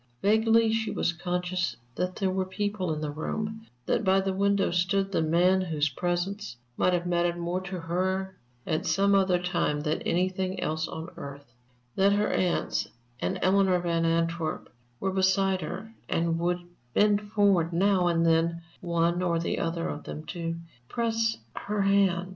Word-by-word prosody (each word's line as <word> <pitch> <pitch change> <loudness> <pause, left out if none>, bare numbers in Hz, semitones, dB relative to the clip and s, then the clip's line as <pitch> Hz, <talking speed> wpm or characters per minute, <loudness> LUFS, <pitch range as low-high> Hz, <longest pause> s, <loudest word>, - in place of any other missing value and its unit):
Vaguely 220 +2 +4
she 225 -1 0
was 170 - 0
conscious 180 -4 -2 0.2
that 180 +5 -2
there 190 -2 0
were 190 0 0
people 200 -2 -2
in 155 -1 -3
the 150 -1 -2
room, 215 +8 -4 0.2
that - - +1
by 190 -1 +4
the 195 0 -1
window 200 0 +2
stood 195 +3 +1
the 175 - +1
man 175 +4 +3
whose 155 -4 0
presence 175 - -2 0.2
might 180 - +2
have 175 0 0
mattered 175 0 +1
more 175 +2 -2
to 185 -1 -5
her 190 +3 -1 0.3
at 155 -1 -1
some 200 +1 +3
other 190 -2 +4
time 175 -4 0
than 155 +1 -1
anything 185 +1 -1
else 160 -1 -1
on 160 +2 -7
earth; 140 -3 -9 0.4
that 195 +1 +4
her 205 +1 +1
aunts 175 - 0 0.3
and 190 - -1
Eleanor 190 -1 +4
Van 170 -1 0
Antwerp 165 -1 -1 0.3
were 190 - -1
beside 190 0 +2
her, 190 +8 -6 0.2
and 165 0 +1
would 175 +1 +1 0.4
bend 205 0 +4
forward 200 -5 +2
now 185 +1 +3
and 165 -1 +2
then, 165 +1 +2 0.2
one 170 0 +1
or 175 -2 +1 0.2
other 165 0 -1
of 145 - -6
them, 155 - -6
to 165 -1 -4 0.3
press 225 -1 0 0.2
her 205 -1 -1
hand. 195 -2 +2
180 Hz, 165 wpm, -28 LUFS, 170-195 Hz, 0.4 s, Vaguely